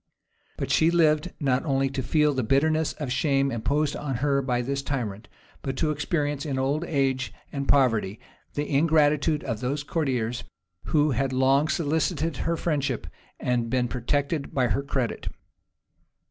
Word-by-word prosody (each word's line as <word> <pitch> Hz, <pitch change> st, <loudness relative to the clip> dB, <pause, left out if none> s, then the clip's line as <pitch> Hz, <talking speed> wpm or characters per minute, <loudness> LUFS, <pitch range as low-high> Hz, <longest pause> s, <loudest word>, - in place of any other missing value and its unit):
But -, -, -3 dB
she 160 Hz, -, +4 dB
lived 165 Hz, 0 st, +3 dB
not 135 Hz, -4 st, +1 dB
only 135 Hz, -3 st, +1 dB
to 135 Hz, -1 st, -2 dB
feel 150 Hz, +2 st, +2 dB
the 130 Hz, -, 0 dB
bitterness 155 Hz, +6 st, +2 dB
of 145 Hz, -5 st, -5 dB
shame 140 Hz, 0 st, +2 dB
imposed 140 Hz, +6 st, 0 dB
on 140 Hz, -3 st, -3 dB
her 140 Hz, +2 st, +1 dB
by 125 Hz, -2 st, 0 dB
this 140 Hz, +2 st, -2 dB
tyrant, 120 Hz, -7 st, -4 dB, 0.3 s
but 135 Hz, -1 st, -4 dB
to 155 Hz, -2 st, +1 dB
experience, 145 Hz, -1 st, -1 dB
in 140 Hz, -4 st, -2 dB
old 140 Hz, +4 st, 0 dB
age 135 Hz, -, 0 dB, 0.2 s
and 140 Hz, -1 st, -3 dB
poverty, 115 Hz, -7 st, +2 dB, 0.4 s
the 145 Hz, +1 st, -1 dB
ingratitude 150 Hz, 0 st, +3 dB
of 115 Hz, -5 st, -3 dB
those 140 Hz, +4 st, -2 dB
courtiers 125 Hz, -7 st, -1 dB, 0.4 s
who 150 Hz, -1 st, +2 dB
had 135 Hz, +2 st, 0 dB
long 135 Hz, +3 st, +3 dB
solicited 160 Hz, -1 st, 0 dB
her 170 Hz, 0 st, -1 dB
friendship, 140 Hz, -7 st, -1 dB, 0.3 s
and 120 Hz, -2 st, 0 dB
been 125 Hz, 0 st, +1 dB
protected 140 Hz, +5 st, -2 dB
by 125 Hz, -3 st, +2 dB
her 140 Hz, -, +1 dB
credit. 135 Hz, -4 st, -2 dB
140 Hz, 155 wpm, -26 LUFS, 130-150 Hz, 0.4 s, she